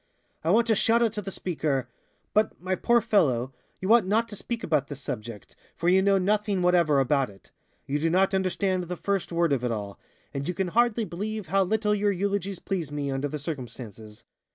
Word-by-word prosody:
I 160 - 0
want 225 +5 +4
to 230 - +3
shout 230 +3 +3
out 225 -2 +1
to 210 - -3
the 195 - -6
speaker: 150 -9 -2 0.5
"But, 215 +1 +1
my 185 +1 -2
poor 235 +5 +3
fellow, 135 - +2 0.3
you 190 +4 +3
ought 230 -5 +5
not 225 +4 +2
to 210 - -7
speak 230 +3 -5
about 150 -4 +1
this 145 -2 -7
subject, 110 -5 -7 0.2
for 170 - +1
you 190 +1 +5
know 200 0 +4
nothing 200 0 +1
whatever 170 -5 +4
about 135 -1 +2
it. 95 -1 -18 0.3
You 145 +2 -1
do 165 +2 +1
not 190 +3 +3
understand 185 -1 0
the 180 +1 -5
first 195 -1 -2
word 170 -3 +2
of 130 -3 -1
it 125 - 0
all, 100 -3 -5 0.3
and 140 0 -3
you 180 - -2
can 190 -2 -1
hardly 235 +2 +2
believe 205 +1 -5
how 195 +2 +3
little 210 +2 +1
your 205 0 +2
eulogies 200 0 -1
please 170 -5 -3
me, 145 -1 -2
under 135 +2 -1
the 150 - -4
circumstances." 115 - -8
180 Hz, 210 wpm, -27 LUFS, 140-205 Hz, 0.5 s, ought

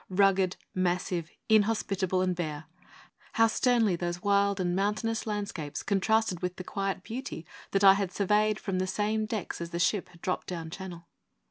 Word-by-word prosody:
Rugged, 190 -1 +3 0.2
massive, 180 -2 -1 0.2
inhospitable, 200 -4 +2
and 185 -1 0
bare, 155 -3 -4 0.7
how 225 - +5
sternly 225 -3 +3
those 175 0 -3
wild 200 0 +3
and 175 -1 0
mountainous 215 +4 -1
landscapes 200 -9 -4
contrasted 210 -1 +1
with 180 0 -2
the 185 - -7
quiet 195 -1 -3
beauty 230 - -6 0.2
that 195 0 +1
I 195 -1 +10
had 195 -2 -1
surveyed 210 +2 +2
from 190 -2 -2
the 185 - 0
same 215 +3 0
decks 215 -6 -4
as 170 - -4
the 170 - -4
ship 180 +2 +1
had 170 -1 -19
dropped 185 - -2
down 165 -3 -5
Channel! 175 -2 -8
195 Hz, 165 wpm, -29 LUFS, 180-210 Hz, 0.7 s, I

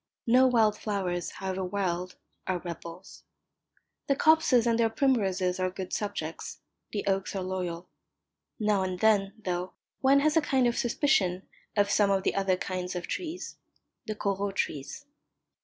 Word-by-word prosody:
No 255 +3 +6
wild 225 -4 +3
flowers, 185 -4 -2
however 190 0 -4
wild, 180 -1 -2 0.3
are 185 - +1
rebels. 170 +1 -9 0.8
The 275 - +3
copses 310 -6 +4
and 230 -1 +2
their 225 -1 +4
primroses 195 -7 +1
are 185 0 +1
good 185 0 -7
subjects, 200 -6 -4 0.3
the 205 - -3
oaks 195 0 -1
are 190 - -2
loyal. 180 -2 -4 0.7
Now 210 -2 +2
and 185 -1 -2
then, 200 -2 +3
though, 180 0 -2 0.3
one 275 +1 +5
has 305 +1 +2
a 325 - +5
kind 265 -4 +2
of 240 -1 +2
suspicion 195 -8 +1 0.3
of 200 0 +3
some 205 -2 +4
of 195 -1 +2
the - - +1
other 195 -2 +1
kinds 185 -1 -4
of 175 - -3
trees 350 +1 -5 0.5
the 215 - -3
Corot 200 -1 -2
trees. 145 - -3
195 Hz, 155 wpm, -28 LUFS, 185-230 Hz, 0.8 s, No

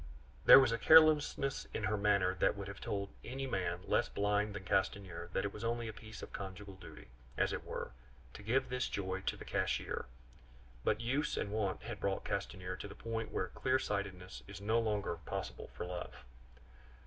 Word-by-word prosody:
There - - +12
was 130 -4 +4
a 115 - 0
carelessness 155 -2 +5
in 110 - -2
her 105 +1 +1
manner 100 -3 +3
that 95 - +2
would 100 0 -5
have 100 0 -8
told 100 -1 -2
any 135 +2 -4
man 90 -8 -1
less - - +2
blind 105 0 +1
than 100 - -5
Castanier 95 -3 -1
that 95 - 0
it 100 - -3
was 105 - -7
only 115 0 -1
a 110 - -5
piece 110 0 -10
of - - -9
conjugal 95 0 -6
duty, 95 - -12 0.3
as - - +2
it - - -3
were, - - -5 0.4
to - - -9
give 125 +5 +1
this 125 0 0
joy 95 -1 -2
to - - -2
the - - -9
cashier; - - -1 0.8
but - - +1
use 135 +6 0
and 100 - -2
wont 105 -2 -1
had 110 -2 -6
brought 100 0 -1
Castanier 95 -2 -3
to 100 - -6
the 100 - -10
point 115 -1 -4
where 95 - -1
clear 130 +6 +1
sightedness 100 -6 -4
is 100 -1 -8
no 110 +3 +2
longer 105 -6 -1
possible 80 - -5
for - - -5
love. 90 0 -5
100 Hz, 195 wpm, -35 LUFS, 95-115 Hz, 0.8 s, There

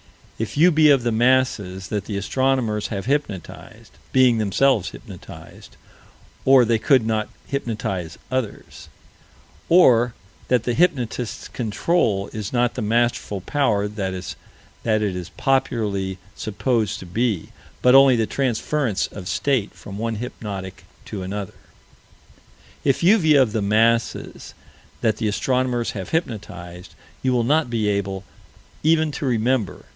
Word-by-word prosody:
If 110 +3 -4
you 175 +4 +6
be 155 -1 +5
of 135 -4 +4
the 120 - 0
masses 110 -6 +1
that 105 -2 -2
the 100 - -4
astronomers 115 0 0
have 100 -3 -5
hypnotized 130 - -4 0.2
being 125 -3 +4
themselves 110 +1 +2
hypnotized, - - -12 0.7
or 130 -2 +6
they 115 -1 +2
could 130 -2 +3
not 110 -1 -1 0.2
hypnotize 105 - -3
others 130 -5 -4 0.8
or 125 -9 +5 0.3
that 125 -3 +2
the 120 - -1
hypnotist's 125 - 0
control 110 - 0
is 105 -3 -5
not 120 -1 +1
the 125 - -4
masterful 115 -2 0
power 105 -4 +1
that 100 -3 -4
it 90 0 -6 0.8
is 90 0 -6
popularly 105 -8 0 0.2
supposed 110 0 -1
to - - -9
be, 105 0 -1 0.3
but 125 - +6
only 135 -4 +6
transference 130 -2 -1
of 95 -3 -9
state 130 +1 0
from 100 0 -9
one 115 0 -2
hypnotic 100 -5 -7 0.2
to 100 - -6
another 95 +1 -5 1.3
If 135 +2 +1
you 205 +6 +6
be 160 -4 +4
of 130 -6 +4
the 110 - -1
masses 115 +3 0 0.5
that 110 - +1
the 110 - -1
astronomers 125 +2 0
have 95 -3 -6
hypnotized, 90 - -5 0.3
you 130 - +1
will 120 -2 +2
not 150 +3 +2
be 115 -3 0
able 100 -2 -1 0.6
even 160 0 +3
to 140 - -4
remember. 115 -4 0
115 Hz, 130 wpm, -22 LUFS, 100-130 Hz, 1.3 s, you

